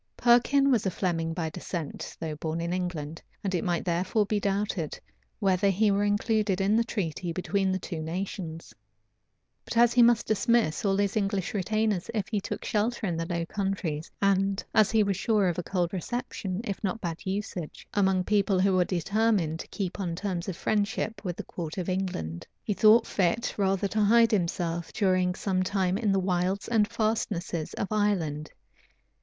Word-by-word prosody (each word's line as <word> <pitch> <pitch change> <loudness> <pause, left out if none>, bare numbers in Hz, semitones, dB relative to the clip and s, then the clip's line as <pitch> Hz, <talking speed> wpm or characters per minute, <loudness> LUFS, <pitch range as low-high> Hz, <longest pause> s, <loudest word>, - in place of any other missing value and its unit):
Perkin 270 +4 +4
was 225 -6 +2
a - - +3
Fleming 165 -3 -1
by 165 -1 -3
descent, 160 0 -6
though 160 -2 -3
born 160 +2 -3
in 170 +1 -2
England; 165 -4 -4 0.2
and 195 -2 -1
it 180 - 0
might 175 -2 -1
therefore 185 +5 +1
be 210 +1 0
doubted 200 -5 -2 0.4
whether 195 +1 +2
he 205 +2 +3
were 200 +1 +2
included 205 -1 +1
in 195 +2 +2
the 230 - +4
treaty 180 -6 -3
between 190 +2 0
the 190 - +1
two 170 -3 -5
nations: 165 - -5 0.9
but - - -5
as 240 0 +6
he 245 - +5
must 235 -1 +5
dismiss 220 -5 +2
all 195 -2 +2
his 200 -1 0
English 195 -3 -1
retainers 215 -1 0
if 205 -3 -1
he 210 -3 -1
took - - -5
shelter 220 +2 0
in 175 -4 -1
the 165 0 -3
Low 170 -1 -2
Countries, 190 -6 -3
and 195 0 +2
as 215 -2 +5
he 220 -1 +3
was 200 -2 0
sure 210 -2 +2
of 175 -1 -1
a - - -2
cold 175 0 -1
reception, 195 -1 -3
if 200 -3 -5
not 210 +3 -1
bad 170 -5 -5
usage, 195 -4 -5
among 190 -2 +2
people 200 -1 +2
who 195 +1 +3
were 180 -1 +3
determined 185 -2 +1
to - - -7
keep 195 -2 -4
on 175 -4 -2
terms 185 -1 -3
of 175 - -5
friendship 215 0 -1
with 180 -3 -3
the - - -4
court 165 -1 -6
of 180 - -3
England, 180 - -3 0.2
he 210 - -1
thought 215 +3 +6
fit 195 +5 0
rather 195 0 +1
to 215 +2 0
hide 230 +2 +5
himself 170 -3 -1
during 185 -3 +2
some 190 -2 0
time 185 -1 0
in 210 -1 +1
the 195 - +3
wilds 185 +1 0
and 220 -3 +3
fastnesses 215 -7 -2
of 200 - -2
Ireland. 175 -8 0
195 Hz, 185 wpm, -28 LUFS, 175-210 Hz, 0.9 s, as